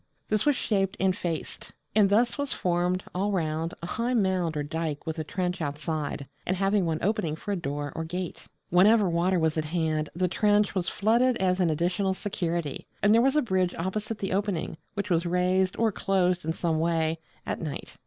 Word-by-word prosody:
This 215 +5 +1
was 290 - +5
shaped 195 -4 0
and 190 -1 +2
faced; 165 -4 -5 0.2
and 205 -2 +5
thus 235 +4 +3
was 285 -2 -2
formed, 180 +1 0
all 195 +3 0
round, 165 -2 -1
a - - -2
high 235 +7 -1
mound 185 -7 +1
or 145 - -1
dyke 155 0 -3
with 160 0 -3
a - - -1
trench 180 +2 -2
outside, 150 -1 -3 0.2
and 185 - -1
having 195 -1 +2
one 160 -1 0
opening 175 -6 0
for 205 - -6
a - - +1
door 145 -4 -3
or 165 - -2
gate. 175 +2 -5 0.2
Whenever 200 +4 +6
water 175 +2 +2
was 160 -1 +1
at 155 - -2
hand 155 -1 -1
the 180 +1 +1
trench 205 +2 +2
was 185 -2 -1
flooded 235 +4 +2
as 185 0 +1
an 180 -3 +3
additional 180 +5 0
security: 170 -7 -3 0.2
and 205 +1 +6
there 230 - +6
was 270 +3 +3
a 300 - +4
bridge 185 -5 +1
opposite 210 +5 -3
the 195 -2 -2
opening, 195 -5 -1 0.2
which 200 -1 -3
was 170 0 +2
raised, 185 +2 +1
or 225 -1 +2
closed 185 -3 +1
in 160 - 0
some 160 -1 0
way, 165 -1 +1 0.3
at - - -3
night. 155 -4 -6
180 Hz, 200 wpm, -27 LUFS, 165-200 Hz, 0.3 s, Whenever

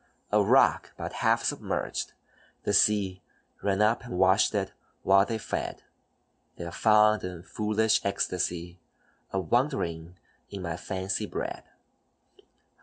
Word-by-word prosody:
A - - +4
rock - - +3
but - - -5
half - - +3
submerged, - - -2 0.5
the 105 - 0
sea 100 -2 +3 0.4
Ran 100 +1 +1
up 110 +3 +2
and 120 -7 -6
washed 95 +3 +4
it 95 -2 -1 0.3
while 100 +1 +5
they 115 - -2
fed; 110 - -4 0.7
Their 85 0 -6
fond 105 +1 +4
and 90 -1 -7
foolish 110 +1 +1
ecstasy 90 -2 -2 0.5
A 95 - 0
wondering 90 - -1 0.3
in 100 -2 -7
my 85 -1 -3
fancy 95 +2 -3
bred. - - -5
95 Hz, 120 wpm, -28 LUFS, 90-105 Hz, 0.7 s, while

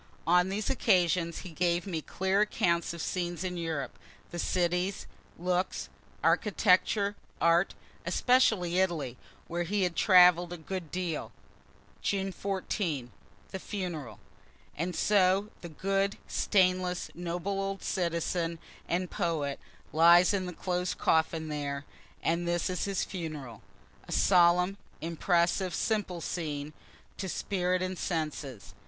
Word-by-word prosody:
On 180 +3 +4
these 205 +2 -2
occasions 175 -6 +2
he 180 - -7
gave 175 +1 0
me 170 -5 -3
clear 190 +5 0
accounts 170 -5 +1
of 170 -1 -5
scenes 175 -1 -2
in 180 -1 -3
Europe 160 -6 -4 0.3
the 175 - -5
cities, 180 +2 0 0.3
looks, 180 +1 -1 0.3
architecture, 205 0 +3 0.2
art, 170 +3 +3 0.3
especially 220 -9 +3
Italy 160 -10 0 0.3
where 175 +1 -2
he 195 +3 0
had 175 -2 0
travel'd 180 -3 +6
a - - -6
good 170 +1 -5
deal. 180 -3 -3 0.7
June 195 -1 0
14. 180 - -3 0.4
The 190 - -5
Funeral. 170 - -5 0.6
And 175 +3 -2
so 200 0 +3
the 175 - -7
good, 195 +4 0
stainless, 185 -2 +1
noble 175 +3 -3
old 195 0 -3
citizen 170 -1 -1 0.3
and 180 +2 0
poet 160 -7 -1 0.3
lies 170 +4 +7
in 190 -2 -1
the 180 - -5
closed 180 0 -2
coffin 160 0 +1
there 145 -1 -3 0.4
and 170 +1 0
this 175 +2 0
is 180 - -1
his 195 -2 -1
funeral. 150 - -6 0.5
A - - -9
solemn, 180 +1 +4 0.2
impressive, 170 +3 +1
simple 205 -6 -1
scene, 150 -3 -4 0.4
to 190 - -4
spirit 185 -1 0
and 185 -1 -3
senses. 150 - -4
180 Hz, 125 wpm, -30 LUFS, 165-190 Hz, 0.7 s, lies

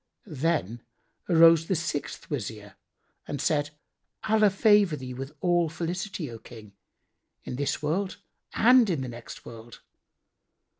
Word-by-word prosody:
Then 150 - -2 0.5
arose 165 -1 +6
the 190 - +1
sixth 160 -2 -4
Wazir 105 -6 -5 0.5
and 145 - -4
said, 145 -2 0 0.5
"Allah 215 -1 +4
favour 200 -3 +4
thee 130 -2 -7
with 135 +3 -7
all 175 -2 +2
felicity, 175 +1 -4
O 115 - -9
King, 110 -3 -13 0.7
in - - -6
this 145 +2 -2
world 185 +6 -1 0.4
and 245 -1 +5
in 160 -7 -1
the 130 - -4
next 120 -1 -10
world! 115 0 -12
155 Hz, 130 wpm, -27 LUFS, 125-180 Hz, 0.7 s, arose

